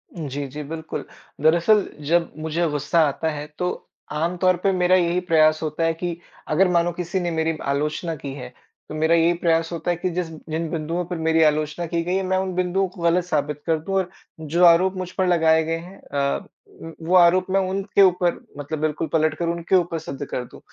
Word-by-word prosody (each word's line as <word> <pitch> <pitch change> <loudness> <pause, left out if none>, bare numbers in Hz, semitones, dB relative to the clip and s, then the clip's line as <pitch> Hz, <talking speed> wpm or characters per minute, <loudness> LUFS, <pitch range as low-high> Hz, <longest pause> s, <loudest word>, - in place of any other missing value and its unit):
जी, 145 -4 -4
जी, 150 +3 -7
बिल्कुल। 160 +2 -6 0.4
दरअसल 170 +7 +4 0.2
जब 170 +1 +2
मुझे 160 +2 -1
गुस्सा 150 +3 0
आता 145 +3 -2
है 150 0 -5
तो, 180 0 -3 0.3
आम 165 +4 -1
तौर 185 0 +3
पे 195 - +3
मेरा 180 0 +3
यही 175 -1 +2
प्रयास 155 -3 +3
होता 155 +1 -2
है 165 0 +2
कि 170 0 -4 0.3
अगर 180 +5 +4
मानो 170 0 +2
किसी 175 +2 -2
ने 175 -1 -2
मेरी 160 0 -1
आलोचना 150 +4 -2
की 140 -2 -7
है, 125 -2 -9 0.4
तो 155 - -6
मेरा 160 +2 +3
यही 170 +1 +4
प्रयास 165 -1 +1
होता 170 +1 -2
है 175 - -1
कि, 185 - -2
जिस 175 0 -2 0.2
जिन 160 +1 -2
बिंदुओं 165 +2 -2
पर 175 0 -5
मेरी 160 0 +4
आलोचना 155 +2 +1
की 170 0 -1
गई 180 +2 -1
है, 195 - 0
मैं 185 0 0
उन 190 -1 -2
बिन्दुओं 185 +1 +1
को 180 -1 -13
गलत 170 +1 +3
साबित 150 -3 -2
कर 160 -2 +1
दूँ 195 +5 -4
और 190 -2 0 0.3
जो 160 +3 0
आरोप 180 +3 +5
मुझ 185 -1 -4
पर 190 -1 +2
लगाए 160 -2 +4
गए 165 +1 -2
हैं 180 +4 -11
अ, 140 -1 -2 0.4
म 165 0 -8
वो 180 - +3
आरोप 180 +1 +6
मैं 195 +1 +2
उनके 195 +1 +1
ऊपर 180 -2 +3 0.2
मतलब 145 +2 -5
बिल्कुल 155 +1 -1
पलटकर 155 +1 +1
उनके 170 +2 0
ऊपर 175 -2 +1
सिद्ध 145 -2 -6
कर 125 - -4
दूँ। - - -14
165 Hz, 215 wpm, -23 LUFS, 155-180 Hz, 0.4 s, आरोप